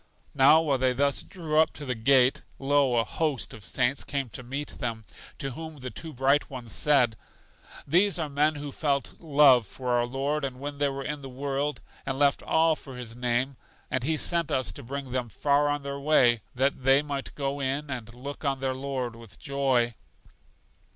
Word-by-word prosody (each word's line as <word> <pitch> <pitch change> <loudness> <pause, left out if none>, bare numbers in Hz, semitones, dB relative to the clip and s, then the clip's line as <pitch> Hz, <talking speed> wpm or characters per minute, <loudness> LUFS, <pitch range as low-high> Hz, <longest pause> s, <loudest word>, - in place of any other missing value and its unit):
Now, 145 +4 +6
while 140 -4 +1
they 130 0 +2
thus 140 +2 +1
drew 160 -5 -1
up 160 - +3
to 145 - -8
the 130 - -1
gate, 125 +2 +4 0.2
lo, 140 -2 +2
a 115 - +4
host 150 +2 -2
of 110 - -11
saints 125 +7 +1
came 140 -3 -3
to 120 - -7
meet 135 +4 -6
them, 115 -3 -3 0.3
to 135 - -4
whom 160 +3 -8
the 125 -2 -7
two 160 - -6
Bright 135 +2 +2
Ones 125 -4 -7
said: 125 -6 +3 0.7
These 180 +7 +3
are 160 -3 -1
men 150 +2 +1
who 145 -1 -6
felt 140 -1 -1
love 140 - +5
for 125 +4 -6
our 120 0 +2
Lord 140 +4 -2
when 140 +2 -6
they 145 -1 +2
were 135 0 -5
in 145 +1 -4
the 135 - -8
world, 140 +2 -2 0.2
and 135 -1 -3
left 140 0 +3
all 160 0 +3
for 135 -4 -10
His 115 -2 -7
name; 125 +2 0 0.3
and 130 - 0
He 155 +3 +1
sent 170 -1 +2
us 130 - 0
to - - -10
bring 135 +1 -6
them 125 -2 -2
far 145 +5 +2
on 145 0 -1
their 140 0 -4
way, 130 -6 +4
that 135 +2 +1
they 135 +2 +5
might 140 -2 -5
go 140 0 -2
in 140 +2 -2
and 120 -3 -5
look 140 +5 -8
on 135 -2 0
their 130 0 -1
Lord 130 -3 -4
with 115 -3 -14
joy. 135 -4 +1
135 Hz, 200 wpm, -27 LUFS, 125-145 Hz, 0.7 s, Now